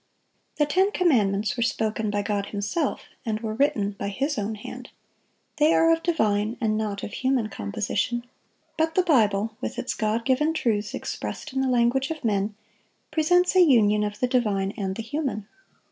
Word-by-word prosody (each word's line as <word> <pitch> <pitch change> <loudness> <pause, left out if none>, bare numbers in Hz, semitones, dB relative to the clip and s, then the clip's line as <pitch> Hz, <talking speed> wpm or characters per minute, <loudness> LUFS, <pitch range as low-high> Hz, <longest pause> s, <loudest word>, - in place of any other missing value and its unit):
The 295 - +2
ten 375 +7 +2
commandments 215 - +2
were 240 - -3
spoken 220 -1 0
by 205 0 -1
God 205 -1 -1
Himself, 210 +9 -2 0.2
and 220 -2 -2
were 220 -1 -3
written 220 -5 +1
by 200 0 -5
His 275 +9 -1
own 210 +2 -2
hand. 245 +4 -9 0.7
They 300 +2 +4
are 330 0 +5
of 330 - -1
divine, 220 - +1
and 220 -2 +1
not 210 -2 -3
of 210 - -6
human 255 -4 0
composition. 205 - -2 0.5
But 320 0 +1
the 370 - +4
Bible, 220 - +2
with - - -4
its 250 - -2
God 220 +1 -1
given 300 +5 +2
truths 210 -7 0
expressed 305 - -5
in 265 - 0
the 265 - +1
language 250 +2 +2
of 315 -5 -5
men, 205 -1 0 0.6
presents 355 +4 +3
a 370 - +7
union 215 -9 +5
of 210 0 -4
the 250 - +2
divine 210 -6 0
and 190 -3 -3
the 225 - -5
human. 235 -4 -3
225 Hz, 175 wpm, -25 LUFS, 210-285 Hz, 0.7 s, a